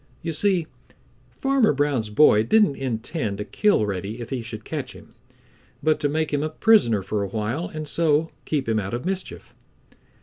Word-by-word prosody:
You 165 Hz, -1 st, -2 dB
see, 185 Hz, 0 st, +1 dB, 0.6 s
Farmer 270 Hz, -, +2 dB
Brown's 140 Hz, -6 st, 0 dB
boy 105 Hz, -1 st, +5 dB
didn't 205 Hz, -, +3 dB
intend 120 Hz, -, -3 dB
to 105 Hz, -, -4 dB
kill 205 Hz, -, +2 dB
Reddy 100 Hz, +3 st, -4 dB
if 120 Hz, +1 st, -8 dB
he 130 Hz, -3 st, -2 dB
should 110 Hz, -1 st, -8 dB
catch 140 Hz, -5 st, -5 dB
him, -, -, -15 dB, 0.7 s
but 155 Hz, -1 st, +2 dB
to 145 Hz, -1 st, 0 dB
make 155 Hz, +1 st, -1 dB
him 145 Hz, -, +1 dB
a 155 Hz, -, -1 dB
prisoner 155 Hz, -, +3 dB
for 105 Hz, +2 st, -2 dB
a 100 Hz, -, -2 dB
while 110 Hz, -, -3 dB
and 155 Hz, -1 st, -6 dB
so 160 Hz, 0 st, +1 dB
keep 145 Hz, -5 st, -2 dB
him 110 Hz, -1 st, +1 dB
out 100 Hz, +2 st, -3 dB
of 120 Hz, -, -6 dB
mischief. 190 Hz, 0 st, -5 dB
145 Hz, 180 wpm, -23 LUFS, 110-160 Hz, 0.7 s, boy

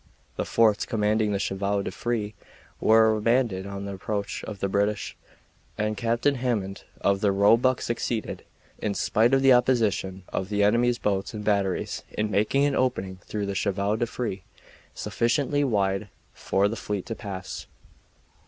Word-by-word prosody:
The -, -, -2 dB
forts 110 Hz, -2 st, +3 dB
commanding 105 Hz, -1 st, +1 dB
the 100 Hz, -, +1 dB
chevaux 100 Hz, +1 st, -1 dB
de -, -, -4 dB
frise 115 Hz, -3 st, -2 dB, 0.5 s
were 110 Hz, 0 st, +5 dB
abandoned 110 Hz, -3 st, +1 dB
on 100 Hz, 0 st, -6 dB
the 100 Hz, -, -5 dB
approach 100 Hz, +1 st, -4 dB
of 105 Hz, -2 st, -7 dB
the 100 Hz, -, 0 dB
British, 100 Hz, +2 st, -1 dB, 0.6 s
and 105 Hz, 0 st, -1 dB
Captain 120 Hz, +6 st, +1 dB
Hammond 115 Hz, -7 st, -2 dB, 0.2 s
of 100 Hz, 0 st, +2 dB
the 100 Hz, -, +3 dB
Roebuck 115 Hz, +6 st, +4 dB
succeeded, 120 Hz, -1 st, -3 dB, 0.4 s
in 105 Hz, -2 st, -2 dB
spite 115 Hz, +3 st, +2 dB
of 135 Hz, 0 st, +3 dB
the 135 Hz, -1 st, +7 dB
opposition 110 Hz, -7 st, +1 dB
of 95 Hz, -, -3 dB
the 105 Hz, -1 st, +1 dB
enemy's 120 Hz, +3 st, +3 dB
boats 100 Hz, -1 st, -1 dB
and 105 Hz, -, -5 dB
batteries, 100 Hz, -3 st, 0 dB
in 105 Hz, 0 st, -2 dB
making 110 Hz, +8 st, +2 dB
an 145 Hz, -, +1 dB
opening 110 Hz, -9 st, -1 dB
through 100 Hz, +3 st, -4 dB
the 100 Hz, -, -3 dB
chevaux 100 Hz, +2 st, 0 dB
de 120 Hz, +1 st, -1 dB
frise 115 Hz, -5 st, -3 dB, 0.6 s
sufficiently 145 Hz, +5 st, 0 dB
wide 100 Hz, -5 st, 0 dB, 0.2 s
for 100 Hz, +1 st, +1 dB
the 110 Hz, -, -3 dB
fleet 105 Hz, -4 st, -4 dB
to -, -, -4 dB
pass. 100 Hz, -4 st, -7 dB
105 Hz, 160 wpm, -26 LUFS, 100-120 Hz, 0.6 s, the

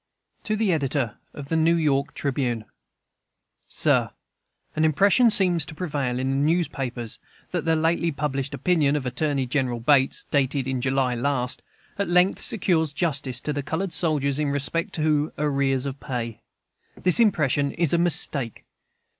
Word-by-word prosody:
To 215 Hz, -, 0 dB
the 215 Hz, -3 st, +1 dB
Editor 140 Hz, -6 st, -1 dB
of 140 Hz, -1 st, -9 dB
the 165 Hz, -, 0 dB
New 160 Hz, +1 st, +3 dB
York 145 Hz, -3 st, 0 dB
Tribune: 125 Hz, -5 st, -2 dB, 1.0 s
SIR, -, -, +1 dB, 0.7 s
An 155 Hz, -, +1 dB
impression 200 Hz, -, +4 dB
seems 180 Hz, -6 st, +2 dB
to 155 Hz, -, -9 dB
prevail 145 Hz, -8 st, -2 dB
in 130 Hz, +1 st, -1 dB
the 145 Hz, -, +2 dB
newspapers 135 Hz, -8 st, -2 dB, 0.3 s
that -, -, -2 dB
the 165 Hz, -1 st, +3 dB
lately 165 Hz, +1 st, +1 dB
published 140 Hz, -2 st, -3 dB
"opinion" 155 Hz, -6 st, +2 dB
of 145 Hz, -3 st, -2 dB
Attorney 135 Hz, +1 st, -1 dB
General 125 Hz, -2 st, -1 dB
Bates 135 Hz, +2 st, +2 dB
(dated 135 Hz, -1 st, 0 dB
in 130 Hz, -2 st, -2 dB
July 130 Hz, -1 st, +1 dB
last) 125 Hz, 0 st, -2 dB, 0.4 s
at 200 Hz, -, -1 dB
length 180 Hz, +2 st, +3 dB
secures 160 Hz, -8 st, 0 dB
justice 140 Hz, -7 st, -1 dB
to 150 Hz, -, -3 dB
the 145 Hz, -, -2 dB
colored 165 Hz, +6 st, -3 dB
soldiers 150 Hz, -3 st, 0 dB
in 150 Hz, -1 st, 0 dB
respect 140 Hz, +4 st, -1 dB
to 155 Hz, -1 st, 0 dB
arrears 140 Hz, -2 st, 0 dB
of 140 Hz, 0 st, -5 dB
pay. 115 Hz, -3 st, -5 dB, 0.6 s
This 180 Hz, +2 st, +3 dB
impression 145 Hz, -, +2 dB
is 170 Hz, -3 st, 0 dB
a 170 Hz, -, +3 dB
mistake. 150 Hz, -8 st, +1 dB
145 Hz, 155 wpm, -24 LUFS, 135-165 Hz, 1.0 s, impression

